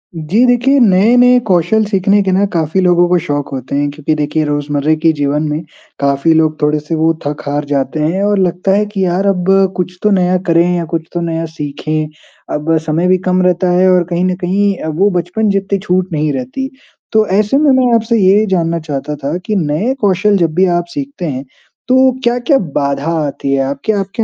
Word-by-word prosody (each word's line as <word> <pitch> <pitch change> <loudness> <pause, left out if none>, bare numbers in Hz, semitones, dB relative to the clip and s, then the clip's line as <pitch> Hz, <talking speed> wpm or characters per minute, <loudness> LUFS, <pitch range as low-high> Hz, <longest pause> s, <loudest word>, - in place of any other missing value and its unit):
जी, 180 +10 +1
देखिए 255 +3 +3
नए-नए 240 +4 +4
कौशल 180 +4 +2
सीखने 200 0 +2
के 190 - 0
ना 190 +2 +2
काफ़ी 165 +2 0
लोगों 175 -1 +3
को 180 - +3
शौक 145 -1 -2
होते 130 +1 -5
हैं 145 0 0
क्योंकि 150 +1 -2
देखिए 150 +1 -1
रोज़मर्रा 145 0 -1
के 165 - +5
जीवन 145 0 -1
में, 150 +1 -2 0.4
काफ़ी 140 +3 +1
लोग 155 -1 +1
थोड़े-से 150 +2 0
वो 160 +1 +2
थक-हार 145 0 -3
जाते 140 +1 -2
हैं 180 +6 0
और 205 -1 +1
लगता 180 +1 0
है 210 +1 +1
कि 195 -2 -1
यार 180 +2 0
अब 190 -1 +1 0.3
कुछ 180 0 -3
तो 210 - +3
नया 185 -1 +2
करें 170 0 +4
या 170 -1 -2
कुछ 165 -1 -1
तो 175 - -2
नया 165 -1 -2
सीखें, 155 0 -4 0.5
अब 160 +2 0
समय 160 +3 0
भी 185 0 +3
कम 185 0 +2
रहता 180 0 +1
है 180 +1 +3
और 180 -1 +3
कहीं 175 0 -1
न 185 0 0
कहीं 195 +2 0
अ, - - -6
वो 170 +6 +1
बचपन 195 +5 -2
जितनी 195 0 -1
छूट 185 -1 -1
नहीं 150 -1 0
रहती। 135 - -4 0.4
तो 220 0 +3
ऐसे 210 +6 +1
में 295 -1 +3
मैं 255 -2 +3
आपसे 230 +1 +1
ये 200 +2 +4
जानना 170 -2 0
चाहता 150 -1 -5
था 145 +5 -2
कि 215 - -1
नए 180 - 0
कौशल 200 0 +2
जब 165 -4 0
भी 185 +2 +4
आप 175 - -2
सीखते 280 -10 -5
हैं, 135 -4 -4 0.4
तो 260 +1 +4
क्या-क्या 245 +4 +2 0.2
बाधा 140 +2 -1 0.2
आती 140 0 -3
है? 135 - +1
आपके 140 +9 -2
आपके 200 +3 -2
175 Hz, 205 wpm, -14 LUFS, 155-200 Hz, 0.5 s, के